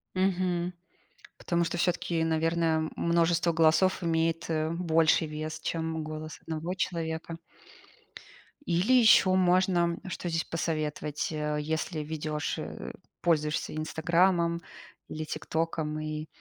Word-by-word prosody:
Мгм. 180 Hz, -2 st, 0 dB, 0.7 s
Потому 170 Hz, 0 st, 0 dB
что 175 Hz, -, -3 dB
всё-таки, 170 Hz, -2 st, 0 dB
наверно, 165 Hz, +1 st, +1 dB
м 160 Hz, -1 st, +1 dB
множество 170 Hz, 0 st, +2 dB
голосов 165 Hz, +4 st, +3 dB
имеет, 165 Hz, 0 st, 0 dB
э, 155 Hz, 0 st, 0 dB
больший 165 Hz, -2 st, +3 dB
вес, 155 Hz, +1 st, -5 dB
чем 160 Hz, -1 st, -2 dB
голос 155 Hz, 0 st, -7 dB
1 165 Hz, +3 st, -4 dB
человека. 165 Hz, -2 st, -3 dB, 1.3 s
Или 180 Hz, +9 st, +2 dB
ещё 220 Hz, -6 st, +6 dB
можно, 180 Hz, -2 st, +3 dB
что 180 Hz, -1 st, -4 dB
здесь 165 Hz, 0 st, -1 dB
посоветовать, 155 Hz, -2 st, -2 dB
э, 150 Hz, -1 st, -2 dB
если 160 Hz, +2 st, -2 dB
ведёшь, 150 Hz, 0 st, -3 dB
э, -, -, -6 dB, 0.3 s
пользуешься 155 Hz, -2 st, 0 dB
"Инстаграмом" 170 Hz, +2 st, +1 dB, 0.5 s
или 155 Hz, 0 st, -4 dB
"ТикТоком", 155 Hz, 0 st, -2 dB
и 155 Hz, 0 st, -4 dB
165 Hz, 115 wpm, -29 LUFS, 155-170 Hz, 1.3 s, ещё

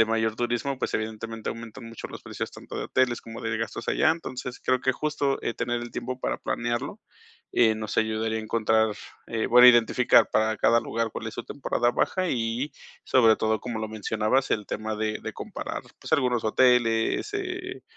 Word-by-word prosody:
de -, -, +7 dB
mayor 110 Hz, 0 st, +1 dB
turismo, 120 Hz, +3 st, -1 dB
pues, -, -, -1 dB
evidentemente 110 Hz, +1 st, -4 dB
aumentan 115 Hz, +2 st, -9 dB
mucho 115 Hz, 0 st, -8 dB
los -, -, -9 dB
precios, -, -, -5 dB
tanto -, -, -9 dB
de -, -, -2 dB
hoteles 130 Hz, -2 st, +1 dB
como 115 Hz, 0 st, -9 dB
de 110 Hz, 0 st, -1 dB
gastos 115 Hz, -1 st, -4 dB
allá. 155 Hz, -, +4 dB
Entonces, 130 Hz, -6 st, -5 dB
creo 130 Hz, 0 st, +2 dB
que 130 Hz, -, +2 dB
justo, 145 Hz, 0 st, -1 dB
eh, 115 Hz, -, -2 dB
tener 120 Hz, 0 st, -2 dB
el 120 Hz, 0 st, -7 dB
tiempo 130 Hz, +1 st, -4 dB
para -, -, -1 dB
planearlo, 120 Hz, 0 st, -3 dB, 0.5 s
eh, 110 Hz, -2 st, +4 dB
nos 110 Hz, -1 st, -5 dB
ayudaría 110 Hz, 0 st, 0 dB
a -, -, -4 dB
encontrar, 110 Hz, 0 st, +2 dB, 0.3 s
eh 110 Hz, -1 st, -1 dB
bueno, 125 Hz, +1 st, +9 dB
identificar 120 Hz, +1 st, +5 dB
para 110 Hz, 0 st, +2 dB
cada 115 Hz, +2 st, +4 dB
lugar 115 Hz, -1 st, -2 dB
cuál 110 Hz, -, -5 dB
es 110 Hz, -, -9 dB
su -, -, -5 dB
temporada 120 Hz, -3 st, 0 dB
baja 185 Hz, +8 st, 0 dB
y, 120 Hz, +4 st, -1 dB, 0.3 s
sobre 115 Hz, -4 st, +5 dB
todo, 110 Hz, 0 st, 0 dB
como 120 Hz, -3 st, -4 dB
lo 110 Hz, -, -2 dB
mencionabas, 110 Hz, +4 st, 0 dB
el 105 Hz, -2 st, 0 dB
tema 110 Hz, 0 st, -3 dB
de 110 Hz, 0 st, -2 dB
de -, -, -5 dB
comparar, -, -, -5 dB, 0.2 s
pues, -, -, -8 dB
algunos 125 Hz, -2 st, +2 dB
hoteles, 115 Hz, -, +3 dB
eh, 370 Hz, -1 st, -4 dB
115 Hz, 190 wpm, -26 LUFS, 110-125 Hz, 0.5 s, bueno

